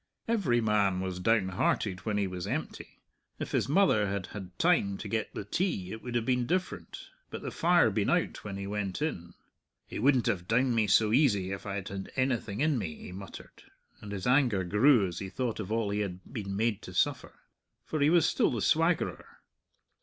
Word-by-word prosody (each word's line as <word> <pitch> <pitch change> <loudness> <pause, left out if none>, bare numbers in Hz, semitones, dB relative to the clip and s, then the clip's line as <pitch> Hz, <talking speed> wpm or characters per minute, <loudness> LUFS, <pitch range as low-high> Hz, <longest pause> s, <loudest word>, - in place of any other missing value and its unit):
Every 180 - +2
man 105 -4 +2
was 95 -1 -3
down 105 0 +2
hearted 95 +1 -1
when 105 -1 0
he 100 - +1
was 90 0 -5
empty. 140 +9 -5 0.4
If - - -5
his - - 0
mother 145 - +4
had 100 -1 -2
had 95 -4 -8
time 160 - +2
to - - -7
get 110 -2 -2
the 100 - -5
tea, 100 - -1
it 110 - -7
would 125 -1 -6
have 120 -1 0
been 125 -1 +1
different; 185 +2 -3 0.2
but - - -7
the - - -4
fire 175 0 +4
had 110 - +1
been 100 -1 +1
out - - 0
when 100 -2 -5
he 100 - -5
went 100 -2 -3
in. 85 - -4 0.5
"He - - -6
wouldn't 130 0 +3
have 90 -1 -1
downed 125 +2 +2
me 110 -2 +2
so 110 +2 +4
easy 105 -9 +3
if 95 +1 -6
I 100 - -3
had 95 -2 -4
had 95 -1 -6
anything 120 -4 -1
in 150 -4 +2
me," 80 -7 -4
he - - -10
muttered, 95 +1 -10 0.4
and 105 - -9
his 95 -2 -5
anger 125 -7 +3
grew 105 +5 +4
as 90 -2 -5
he 95 - -5
thought 120 +1 -3
of 105 -1 -5
all 110 -2 0
he 105 - -1
had 95 -3 -4
been 100 -5 -4
made 110 0 0
to - - -10
suffer. - - 0 0.5
For 155 - -3
he 145 +1 +4
was 170 -1 +4
still - - +2
the 120 - -2
swaggerer. 165 +1 0
105 Hz, 215 wpm, -30 LUFS, 95-130 Hz, 0.5 s, mother